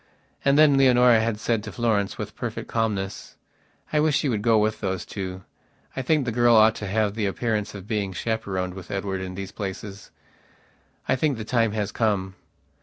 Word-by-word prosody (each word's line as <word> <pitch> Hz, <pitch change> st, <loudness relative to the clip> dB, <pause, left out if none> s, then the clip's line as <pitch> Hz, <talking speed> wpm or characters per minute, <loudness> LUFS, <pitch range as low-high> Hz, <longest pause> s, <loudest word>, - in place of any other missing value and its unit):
And 140 Hz, 0 st, +3 dB
then 150 Hz, -2 st, +6 dB
Leonora 125 Hz, -3 st, +6 dB
had 110 Hz, -1 st, -1 dB
said 115 Hz, -1 st, 0 dB
to 110 Hz, -, -7 dB
Florence 110 Hz, -5 st, 0 dB
with -, -, -6 dB
perfect -, -, -5 dB
calmness: 105 Hz, -4 st, -2 dB, 0.6 s
"I 150 Hz, -, +3 dB
wish 150 Hz, -1 st, +2 dB
you 140 Hz, -, +1 dB
would 105 Hz, -3 st, -1 dB
go 115 Hz, +1 st, +4 dB
with 110 Hz, +1 st, +1 dB
those 95 Hz, -3 st, -2 dB
two. 95 Hz, -2 st, -6 dB, 0.5 s
I 135 Hz, -, -2 dB
think 145 Hz, +1 st, +1 dB
the 120 Hz, -, -1 dB
girl 120 Hz, 0 st, +4 dB
ought 110 Hz, 0 st, +6 dB
to 100 Hz, -, -5 dB
have 105 Hz, +1 st, 0 dB
the 105 Hz, -2 st, -1 dB
appearance 105 Hz, 0 st, -2 dB
of 95 Hz, -2 st, -8 dB
being 105 Hz, -3 st, -1 dB
chaperoned 95 Hz, -3 st, -3 dB
with 95 Hz, -2 st, -10 dB
Edward 95 Hz, -1 st, -3 dB
in 95 Hz, -1 st, -6 dB
these 95 Hz, 0 st, -6 dB
places. 100 Hz, 0 st, -7 dB, 1.0 s
I 130 Hz, -, +3 dB
think 140 Hz, -1 st, 0 dB
the 110 Hz, -, -6 dB
time 115 Hz, -2 st, +1 dB
has 105 Hz, -2 st, -2 dB
come." 100 Hz, -4 st, 0 dB
110 Hz, 190 wpm, -24 LUFS, 100-120 Hz, 1.0 s, then